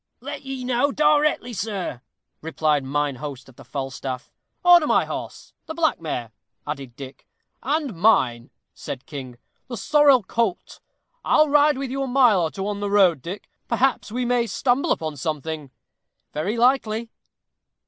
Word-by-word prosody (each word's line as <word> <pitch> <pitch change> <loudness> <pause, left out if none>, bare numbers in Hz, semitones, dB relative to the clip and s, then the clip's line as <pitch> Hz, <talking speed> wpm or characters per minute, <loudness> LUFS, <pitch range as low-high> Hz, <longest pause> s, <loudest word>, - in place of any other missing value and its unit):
"Let - - -7
ye 270 -2 -6
know 250 +3 +1
directly, 300 -4 +2
sir," 195 - -4 0.4
replied 155 -2 0
mine 145 0 -1
host 140 -1 -7
of 130 - -17
the - - -14
Falstaff. 135 -1 -5 0.3
"Order 350 -3 +7
my - - +3
horse - - -7
the 320 - -6
black 315 - +1
mare," 125 -8 -4 0.3
added 135 -5 -6
Dick. 135 0 -11 0.3
"And 285 -1 -1
mine," 130 - +2 0.2
said 130 -1 -7
King, 130 -5 -8 0.3
"the 240 -2 -6
sorrel 285 0 +4
colt. 225 -2 -2 0.4
I'll 305 -1 +4
ride 295 0 +4
with 270 -2 -4
you 275 +1 -2
a 270 - -1
mile 245 -7 +4
or 165 - 0
two 195 +4 -5
on 205 -1 -3
the 205 0 -2
road, 190 -8 +4
Dick; 185 +8 -7 0.2
perhaps 240 -2 +1
we 245 +2 -2
may 240 -1 +1
stumble 245 +5 +1
upon 155 -2 -2
something." 155 0 -4 0.6
"Very 195 +10 -2
likely." 235 -2 +1
205 Hz, 155 wpm, -23 LUFS, -, 0.6 s, Order